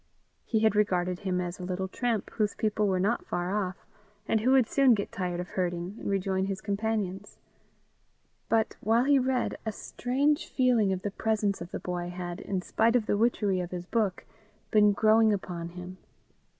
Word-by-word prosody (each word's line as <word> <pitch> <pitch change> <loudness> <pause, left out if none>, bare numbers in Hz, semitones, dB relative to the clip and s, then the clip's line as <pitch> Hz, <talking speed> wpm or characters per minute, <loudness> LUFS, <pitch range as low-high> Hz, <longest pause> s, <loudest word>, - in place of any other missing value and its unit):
He 220 -2 +1
had 220 -1 +3
regarded 180 -3 +1
him 185 -2 -1
as 175 0 -4
a - - -6
little 185 +1 -2
tramp, 230 +1 -2
whose 210 -2 -1
people 215 -1 0
were 190 -2 +1
not 210 +6 0
far 175 +1 -2
off, 190 -3 -3 0.4
and 220 - +2
who 230 +4 +1
would 260 -4 +5
soon 270 -4 +4
get 200 - -4
tired 180 -2 -3
of 180 - -5
herding 175 +1 -2
and - - -4
rejoin 190 -1 0
his 195 -1 -3
companions; 205 -1 -3 1.1
but 225 -1 +1
while 225 +3 +3
he 280 0 +4
read, 255 -1 0
a 220 - -2
strange 275 +7 -1
feeling 245 -6 +3
of 185 -1 -2
the 205 - -2
presence 210 -2 0
of 170 - -6
the - - -5
boy 175 -1 -4
had, 175 -1 -5
in 190 -2 -3
spite 230 +5 +2
of 235 -3 +2
the - - +1
witchery 205 -3 +1
of 175 -1 -3
his 180 -1 -6
book, 210 -2 -1 0.5
been 210 -1 +6
growing 220 +2 +4
upon 175 -4 -3
him. 180 +1 -9
200 Hz, 190 wpm, -28 LUFS, 180-220 Hz, 1.1 s, been